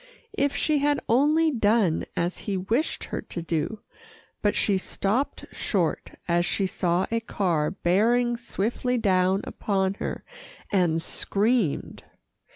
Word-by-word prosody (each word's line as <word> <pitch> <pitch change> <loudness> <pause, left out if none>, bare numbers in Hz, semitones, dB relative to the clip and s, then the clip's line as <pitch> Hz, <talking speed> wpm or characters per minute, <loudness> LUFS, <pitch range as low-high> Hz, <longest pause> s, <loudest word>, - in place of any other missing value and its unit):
If 280 0 0
she 305 -2 +2
had 290 0 +2
only 305 +7 +4
done 215 - +2
as 175 +2 -1
he 195 - 0
wished 225 - -1
her - - -4
to 170 - -6
do, 170 +6 -2 0.6
but 205 - +1
she 195 -2 +2
stopped 215 +8 -1
short, - - -1
as 175 0 +2
she 195 +3 0
saw 180 -1 0
a 230 - +1
car 175 -9 0
bearing 230 +7 +2
swiftly 240 +2 -2
down 190 -2 +2
upon 190 -2 -1
her, - - -4 0.5
and 175 -4 +2
screamed. 205 - 0
205 Hz, 130 wpm, -26 LUFS, 185-240 Hz, 0.6 s, only